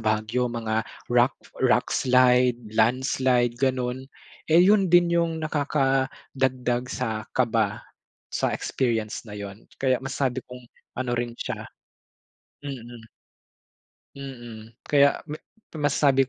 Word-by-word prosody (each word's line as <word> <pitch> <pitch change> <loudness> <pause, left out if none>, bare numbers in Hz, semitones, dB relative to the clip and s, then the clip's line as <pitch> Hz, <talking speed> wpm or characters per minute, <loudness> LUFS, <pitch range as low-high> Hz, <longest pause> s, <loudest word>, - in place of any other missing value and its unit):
Baguio 110 +3 0
mga 110 -1 -1 0.3
rock, 120 +2 +4 0.3
rock 125 -1 +3
slide, 125 -1 +4 0.2
landslide, 120 +1 +2
ganon. 130 -1 -1 0.4
Eh 165 +2 +6
'yun 195 +1 +5
din 175 0 +5
'yung 170 -1 +1
nakakadagdag 135 -4 0
sa 110 -3 -3
kaba 110 -4 +1 0.5
sa - - -1
experience 115 -4 -1
na 105 -2 -8
'yun. 100 +1 -8
Kaya 130 -1 +1
masabi 135 -2 -2
'kong 125 -1 -12 0.3
ano 130 -1 -1
rin 120 0 -2
siya - - -4 1.0
mm. 120 -4 -8 1.1
Mm. 120 -5 -9
Kaya 140 -1 +3
ma 155 0 -7 0.5
masasabi 135 -2 +3
125 Hz, 105 wpm, -25 LUFS, 120-135 Hz, 1.1 s, Eh